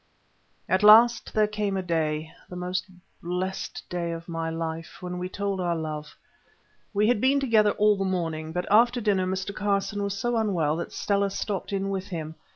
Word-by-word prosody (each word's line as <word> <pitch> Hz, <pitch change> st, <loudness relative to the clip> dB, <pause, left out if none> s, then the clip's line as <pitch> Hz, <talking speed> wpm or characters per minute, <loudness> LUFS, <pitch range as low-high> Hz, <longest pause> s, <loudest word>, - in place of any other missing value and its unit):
At 185 Hz, -, +2 dB
last 220 Hz, +2 st, +7 dB
there 215 Hz, -1 st, +3 dB
came 210 Hz, -2 st, -2 dB
a 190 Hz, -, -2 dB
day—the 160 Hz, 0 st, -3 dB
most 180 Hz, +1 st, -3 dB, 0.3 s
blessed 180 Hz, +2 st, -4 dB
of 170 Hz, -1 st, -3 dB
my 165 Hz, -1 st, -3 dB
life, 165 Hz, +1 st, -5 dB
when 180 Hz, -1 st, -5 dB
we 180 Hz, 0 st, -4 dB
told 200 Hz, -1 st, -2 dB
our 175 Hz, -1 st, 0 dB
love. 155 Hz, -2 st, -5 dB, 0.7 s
We 210 Hz, 0 st, +2 dB
had 235 Hz, -3 st, +2 dB
been 275 Hz, +2 st, +4 dB
together 220 Hz, -6 st, +3 dB
all 210 Hz, 0 st, +4 dB
the 195 Hz, -, -2 dB
morning, 165 Hz, -4 st, -2 dB
but 180 Hz, +2 st, -2 dB
after 240 Hz, +3 st, +5 dB
dinner 200 Hz, -4 st, +1 dB
Mr. 190 Hz, +1 st, -3 dB
Carson 205 Hz, +1 st, -1 dB
was 200 Hz, 0 st, -2 dB
so 240 Hz, +3 st, 0 dB
unwell 175 Hz, -9 st, +1 dB
that 170 Hz, -, -5 dB
Stella 200 Hz, -1 st, 0 dB
stopped 195 Hz, 0 st, -4 dB
in 195 Hz, 0 st, -1 dB
with 190 Hz, 0 st, -3 dB
him. 160 Hz, -4 st, -5 dB
190 Hz, 175 wpm, -26 LUFS, 170-210 Hz, 0.7 s, last